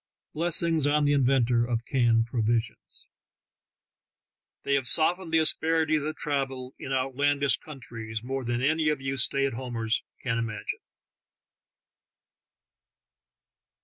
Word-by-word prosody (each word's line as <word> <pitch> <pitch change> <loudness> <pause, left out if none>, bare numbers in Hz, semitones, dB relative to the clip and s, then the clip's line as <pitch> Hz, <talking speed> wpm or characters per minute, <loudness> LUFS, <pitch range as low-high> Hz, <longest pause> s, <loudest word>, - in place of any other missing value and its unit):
Blessings 165 -2 +1
on 150 0 +2
the 145 - +3
inventor 125 -3 +3
of 120 -1 -2
canned 115 -4 +2
provisions! 115 -1 -2 1.6
They 140 - 0
have 135 -3 +1
softened 165 +8 +2
the 160 - +4
asper 160 +1 +2
ities 155 -2 +1
of 155 - -6
travel 135 -3 -3
in 135 - -6
outlandish 135 +1 +1
countries 115 -6 -8
more 135 +1 -3
than 120 +1 -2
any 155 +2 +2
of 150 -2 0
you 135 0 -3
stay 135 +2 +2
at 135 - -1
homers 115 -2 -2 0.2
can 115 -3 -1
imagine. 110 -3 -4
135 Hz, 120 wpm, -27 LUFS, 120-145 Hz, 1.6 s, the